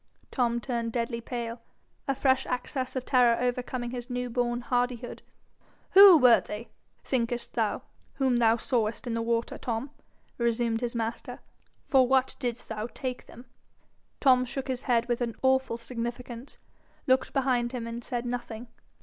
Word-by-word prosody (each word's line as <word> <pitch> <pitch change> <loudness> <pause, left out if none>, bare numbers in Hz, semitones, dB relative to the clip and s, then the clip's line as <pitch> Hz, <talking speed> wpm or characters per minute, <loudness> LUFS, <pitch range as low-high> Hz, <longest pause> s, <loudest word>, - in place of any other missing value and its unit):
Tom 240 -2 +1
turned 235 -2 -3
deadly 235 0 -2
pale, 235 -1 -5 0.5
a 275 - +1
fresh 265 0 +2
access 255 +1 -3
of 255 -1 -3
terror 245 -2 +4
overcoming 245 0 -2
his 245 0 -6
new 245 -1 -3
born 240 0 0
hardihood. 245 0 -2 0.7
'Who 390 -3 +10
were 250 -4 +6
they, 210 +3 -7 0.3
thinkest 240 -2 -2
thou, - - -1 0.3
whom 260 -3 +2
thou 230 -1 +4
sawest 225 -2 -1
in 240 - -2
the 230 - -1
water, 230 0 -1
Tom?' 240 +4 -3 0.5
resumed 235 -1 0
his 240 -1 -3
master. 230 0 -3 0.5
'For 260 -3 +4
what 265 0 +2
didst 245 -2 -4
thou 220 0 -4
take 255 0 -6
them?' 240 +2 -13 0.7
Tom 255 -2 +5
shook 265 +2 -5
his 255 -1 -1
head 235 -3 +1
with 240 0 -1
an 235 -2 -2
awful 260 -2 +2
significance, 240 +2 -6 0.5
looked 260 0 +2
behind 255 -3 +1
him, 245 -3 -4
and 230 +1 -6
said 245 -1 -3
nothing. 240 -1 -5
245 Hz, 155 wpm, -28 LUFS, 235-255 Hz, 0.7 s, Who